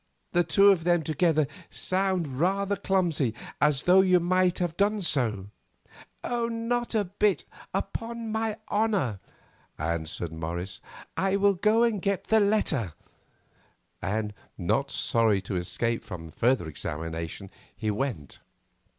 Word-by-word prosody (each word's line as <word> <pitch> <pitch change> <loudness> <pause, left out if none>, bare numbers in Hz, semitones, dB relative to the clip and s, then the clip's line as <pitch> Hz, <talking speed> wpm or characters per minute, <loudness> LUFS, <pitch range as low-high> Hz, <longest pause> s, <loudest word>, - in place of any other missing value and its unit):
The 175 0 +3
two 195 +5 +6
of 175 -4 +1
them 175 -1 +2
together 155 -1 +2 0.2
sound 185 -8 -1
rather 195 +4 +1
clumsy, 175 - +1 0.3
as 150 -1 +3
though 185 +2 +6
you 185 -1 +4
might 180 +1 +2
have 175 -3 -1
done 205 +1 +1
so." 110 - 0 0.7
"Not 235 0 -1
a 215 - +3
bit, 200 +2 +1 0.3
upon 230 -1 -4
my 220 -1 -1
honour," 205 - +1 0.6
answered 80 +1 -3
Morris. 85 +3 -5 0.3
"I 195 +1 +1
will 200 0 +4
go 215 +5 +3
and 225 -5 +1
get 200 0 0
the 220 - +3
letter," 185 - +1 1.1
and, 105 +1 -2 0.2
not 135 +10 0
sorry 115 -6 +2
to 95 - -4
escape 115 +6 -1
from 90 -7 -8
further 120 -5 +1
examination, 80 +5 -4 0.3
he 110 -1 -1
went. 105 - -4
170 Hz, 125 wpm, -27 LUFS, -, 1.1 s, two